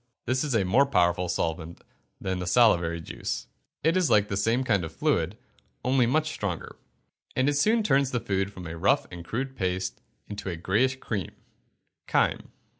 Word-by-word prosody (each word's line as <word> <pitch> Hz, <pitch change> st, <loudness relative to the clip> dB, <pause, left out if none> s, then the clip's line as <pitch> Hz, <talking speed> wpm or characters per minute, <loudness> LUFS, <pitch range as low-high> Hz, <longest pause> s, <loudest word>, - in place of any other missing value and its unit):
This 130 Hz, +2 st, +1 dB
is 145 Hz, -5 st, -1 dB
a 100 Hz, -4 st, +2 dB
more 130 Hz, +10 st, +4 dB
powerful 90 Hz, -5 st, +2 dB
solvent 85 Hz, -1 st, -3 dB, 0.4 s
than 95 Hz, -1 st, -2 dB
the 90 Hz, -, -4 dB
salivary 85 Hz, -6 st, +4 dB
juice -, -, -4 dB, 0.4 s
it 160 Hz, +3 st, +3 dB
is 180 Hz, -6 st, +2 dB
like 105 Hz, -2 st, +4 dB
the 100 Hz, -, -1 dB
same 115 Hz, +6 st, +1 dB
kind 100 Hz, -8 st, +1 dB
of 80 Hz, -, -5 dB
fluid, -, -, 0 dB, 0.5 s
only 130 Hz, -1 st, +3 dB
much 155 Hz, +5 st, +1 dB
stronger, 100 Hz, -, -4 dB, 0.6 s
and 130 Hz, +1 st, +2 dB
it 145 Hz, -, +3 dB
soon 215 Hz, +11 st, +3 dB
turns 140 Hz, -7 st, +3 dB
the 125 Hz, -, -1 dB
food 95 Hz, -2 st, -1 dB
from 95 Hz, -3 st, -9 dB
a 80 Hz, 0 st, -6 dB
rough 100 Hz, +4 st, +3 dB
and 85 Hz, -1 st, -8 dB
crude 130 Hz, +9 st, -4 dB
paste 95 Hz, -3 st, -2 dB, 0.3 s
into 100 Hz, -1 st, -5 dB
a 85 Hz, -, -3 dB
greyish 105 Hz, +10 st, +1 dB
cream 105 Hz, -9 st, -4 dB, 0.7 s
(chyme). -, -, +1 dB
105 Hz, 180 wpm, -27 LUFS, 90-130 Hz, 0.7 s, more